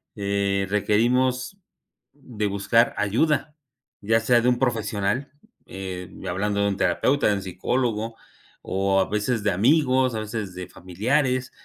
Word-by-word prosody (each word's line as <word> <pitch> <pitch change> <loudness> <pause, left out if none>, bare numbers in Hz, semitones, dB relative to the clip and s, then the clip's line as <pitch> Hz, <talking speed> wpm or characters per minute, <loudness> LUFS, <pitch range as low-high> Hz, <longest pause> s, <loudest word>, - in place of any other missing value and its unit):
eh, 100 -1 0
requerimos 125 - +1 0.6
de 125 -7 -5
buscar 100 +4 +2
ayuda 150 +8 0 0.5
ya 110 +2 +2
sea 120 +1 +3
de 125 - +3
un 125 - +1
profesional, 115 +1 -1 0.3
em 95 -1 -7
y - - -6
hablando 100 +3 -1
de 100 - +2
un 100 - -3
terapeuta, 140 +7 +1
de 105 - +3
un 100 - -4
psicólogo 115 +3 -2 0.5
o 95 0 +1
a - - -2
veces 105 +2 -1
de 105 - +2
amigos, 130 - +3
a - - -2
veces 105 -3 -5
de 90 -1 -6
familiares 125 - -1
110 Hz, 145 wpm, -24 LUFS, 100-125 Hz, 0.6 s, sea